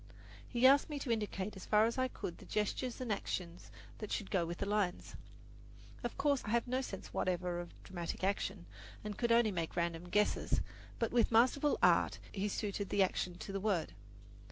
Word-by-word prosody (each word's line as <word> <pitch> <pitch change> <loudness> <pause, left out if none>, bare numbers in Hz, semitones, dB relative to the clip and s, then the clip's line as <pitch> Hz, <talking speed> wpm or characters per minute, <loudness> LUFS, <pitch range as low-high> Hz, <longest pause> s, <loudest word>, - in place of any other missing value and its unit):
He 240 0 +2
asked 280 +3 +7
me 295 - -3
to 265 -3 -2
indicate 210 -2 -2
as 190 - -9
far 215 0 +5
as 230 +3 -1
I 255 - +3
could 175 -8 -6
the - - -12
gestures 215 +4 -1
and 250 -3 -3
action 175 -3 -4 0.4
that 215 - -6
should 205 - -2
go 175 -3 +1
with 170 +1 -4
the - - -2
lines. 200 -3 -1 0.9
Of - - -3
course, 285 -3 +2
I - - -5
have 235 +2 +1
no 255 +2 0
sense 195 -7 -7
whatever 180 -1 0
of 175 0 -9
dramatic 175 -1 -5
action, 195 -1 -1 0.4
and 210 -1 -4
could 235 +2 0
make 230 - +6 0.2
only 165 -2 -1
random 170 0 -1
guesses; 210 +3 +2 0.4
but 230 - 0
with 240 -1 +3
masterful 260 +6 +4
art - - +5
he 200 0 -1
suited 200 -1 -2
the 200 - +4
action 180 -1 -1
to 195 - -7
the 195 - -2
word. 185 - 0
205 Hz, 195 wpm, -35 LUFS, 180-235 Hz, 0.9 s, asked